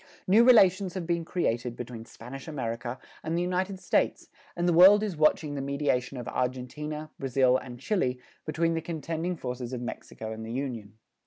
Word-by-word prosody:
New 210 +5 +6
relations 195 -6 +5
have 185 -3 -3
been 170 0 0
created 120 -9 -1
between 120 -2 -7
Spanish 125 +3 -10
America 120 -4 -4 0.2
and 165 +1 -2
the - - +1
United 185 +2 -1
States - - 0 0.3
and 175 0 0
the 175 - +4
world 195 +5 +8
is 205 -5 -2
watching 155 -1 +2
the 140 - -3
mediation 140 -2 -1
of 125 - -6
Argentina, 150 +5 -3
Brazil 130 -1 +3
and 120 -2 -9
Chile 130 - 0 0.2
between 165 +2 0
the 165 - -1
contending 165 +2 -3
forces 125 -3 -5
of 125 - -3
Mexico 110 -2 -6
and 110 0 -6
the 110 - -6
Union. 120 -6 -4
145 Hz, 175 wpm, -28 LUFS, 125-175 Hz, 0.3 s, world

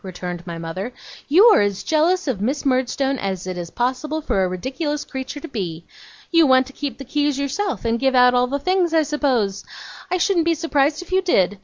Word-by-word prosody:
returned 180 -2 -6
my 170 -1 -5
mother. 170 +8 -5 0.4
'You 355 +9 +6
are - - +4
as 200 -1 -1
jealous 330 +3 +1
of 235 -8 -2
Miss 270 +8 -1
Murdstone 265 +1 0
as 190 -2 -3
it 185 -1 -4
is 175 -1 -6
possible 265 - -2
for 195 -10 0
a - - +1
ridiculous 265 - -3
creature 265 +2 -6
to 330 - -8
be. 175 - -5 0.5
You 330 -3 +5
want 260 0 +5
to 270 - -13
keep 285 -1 -5
the 275 - -9
keys 290 +1 0
yourself, 285 +5 -2
and 230 0 0
give 265 0 +1
out 250 0 +6
all 250 0 +3
the 280 +3 -1
things, 355 +2 +1
I 320 - +4
suppose? 260 -10 0 0.5
I 365 - +1
shouldn't 355 -2 +1
be 335 0 +2
surprised 305 0 0
if 360 - -17
you 380 +1 +3
did. 205 - +1
265 Hz, 215 wpm, -21 LUFS, 205-310 Hz, 0.5 s, You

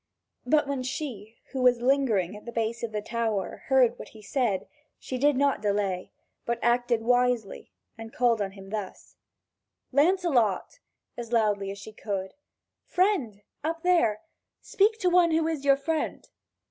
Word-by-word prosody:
But 300 +3 +3
when 280 -2 -2
she, 245 -5 -5
who 265 - -3
was 250 -1 +4
lingering 240 -8 +1
at 210 - -12
the 235 - -6
base 230 0 -2
of 235 - -3
the 210 -1 -3
tower, 225 -4 -2
heard 255 -3 +3
what - - -8
he 215 -1 -15
said, 205 -4 -1 0.3
she 255 - -5
did 290 0 +3
not 280 -4 +2
delay, 200 -3 -1 0.3
but 235 0 -1
acted 240 -1 +2
wisely 245 -3 0 0.3
and 225 0 -8
called 235 -3 +2
him 195 0 -6
thus: 210 -3 -6 0.7
"Lancelot," 290 - +2 0.4
as 235 -1 -6
loudly 210 -4 +1
as 200 - -6
she 215 +2 -10
could; 195 -3 -4 0.5
"friend, 280 - 0 0.2
up 330 +1 -3
there, 330 -13 +3 0.4
speak 425 +3 +2
to 365 - +2
one 350 -1 +5
who 320 0 +1
is 315 -4 -2
your 275 -1 +5
friend!" 315 +3 -3
240 Hz, 155 wpm, -27 LUFS, 210-280 Hz, 0.7 s, one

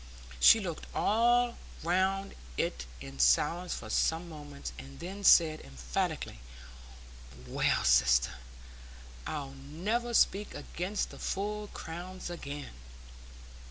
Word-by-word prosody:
She 225 - +8
looked 175 -6 -5
all 240 +2 +3 0.3
round 190 +3 +1 0.2
it 65 0 -2
in 70 0 -9
silence 150 - +3
for - - -7
some 165 +2 +1
moments, 145 - -8
and 70 +1 -11
then 195 +3 -7
said 160 -5 +6
emphatically, 60 -2 -3 1.1
"Well, - - +1
sister, 60 +1 +4 1.0
I'll 145 -3 -4
never 190 - -2
speak 205 0 +3
against 185 +4 -3
the - - -11
full 210 +2 -2
crowns 175 +1 -7
again!" 145 -4 -6
170 Hz, 105 wpm, -31 LUFS, 135-195 Hz, 1.1 s, She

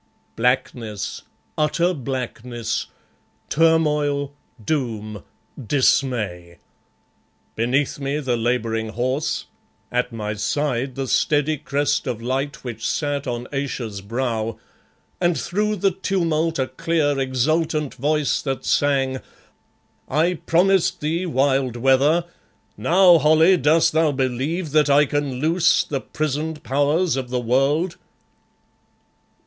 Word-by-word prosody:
Blackness, 120 -3 -1 0.4
utter 170 +4 +2
blackness; 125 -4 -4 0.6
turmoil, 150 -3 +2 0.3
doom, 110 - -2 0.4
dismay! 110 -9 0 1.0
Beneath 135 +6 0
me 140 +1 -2
the 130 -4 -1
labouring 115 -1 -1
horse; 130 +6 -2 0.5
at 125 0 0
my 105 -2 -4
side 130 +4 -1
the 135 -1 -3
steady 150 +3 +2
crest 145 0 -1
of 120 -3 -2
light 130 +4 -3
which 115 -3 -7
sat 145 -2 -2
on 120 0 -3
Ayesha's 125 -7 -3
brow, 115 0 -2 0.6
and 175 -2 +1
through 210 +4 -1
the 195 0 +1
tumult 170 -4 0
a 130 - +1
clear, 145 +1 0
exultant 150 +3 0
voice 150 +2 0
that 135 -2 -3
sang 135 -2 +1 0.9
"I 160 +6 +2
promised 180 +2 +2
thee 165 +4 -1
wild 135 -4 +1
weather! 135 +7 +3 0.5
Now, 175 -1 +5
Holly, 160 +5 +5
dost 155 +1 +3
thou 160 -1 +3
believe 140 +5 -2
that 150 -1 +3
I 145 +1 +5
can 145 -1 -2
loose 165 +6 +2
the 140 -3 -3
prisoned 155 +1 -3
Powers 145 +7 +1
of 130 -2 -4
the 125 0 -1
world?" 140 +9 +1
140 Hz, 110 wpm, -22 LUFS, 125-155 Hz, 1.0 s, Now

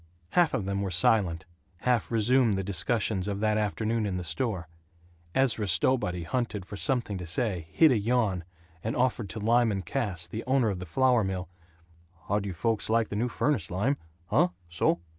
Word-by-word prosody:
Half 170 - +3
of 100 - -2
them 100 0 -1
were 100 - -1
silent; 90 -1 +2 0.4
half 125 -3 +1
resumed 115 0 +3
the 95 - -1
discussions 100 +1 -1
of 100 -1 -2
that 110 0 +2
afternoon 110 +2 0
in 95 -2 -2
the 90 - -4
store. 90 0 -2 0.7
Ezra 115 -6 +2
Stowbody 90 -1 +1
hunted 110 -1 -2
for 100 - -8
something 120 -4 -1
to 90 - -5
say, 90 -2 -1
hid 155 - +5
a 120 - +3
yawn, 105 -5 +1 0.4
and 110 - -2
offered 120 -5 0
to 110 - -5
Lyman 110 -3 +2
Cass, 100 -11 -2
the 110 +6 -6
owner 130 -3 +3
of 95 - -4
the 90 - -7
flour 125 +4 +3
mill, 95 -2 -3 0.8
"How 105 +1 +2
d' 100 - -5
you 95 - -3
folks 110 +6 -1
like 115 -1 +2
the - - -4
new 120 +4 0
furnace, 145 -2 0
Lym? 115 +11 0 0.3
Huh? 90 - +3 0.2
So." 85 0 +1
105 Hz, 185 wpm, -28 LUFS, 95-120 Hz, 0.8 s, hid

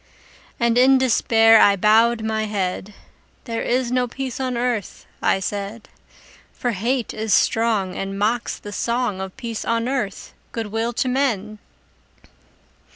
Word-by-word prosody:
And 235 0 +2
in 265 +1 +6
despair 225 -3 +4
I 200 - +6
bowed 220 +3 +3
my 220 0 -1
head; 200 -1 -3 0.5
"There 230 -3 -4
is 250 0 0
no 250 0 +1
peace 260 +1 -5
on 255 -2 -2
earth," 240 -4 -3 0.2
I - - +2
said: 205 +3 -5 0.6
"For 245 - -2
hate 235 +4 -2
is 215 -2 +1
strong, 220 -5 +1
And 195 0 -4
mocks 225 +4 -1
the 205 - -9
song 235 -4 -1
Of 190 +3 -7
peace 235 -4 -5
on 230 +1 -1
earth, 245 -7 -3 0.2
good 225 -3 -4
will 225 +2 -1
to 255 - -1
men!" 225 -6 -1
225 Hz, 145 wpm, -21 LUFS, 210-245 Hz, 0.6 s, in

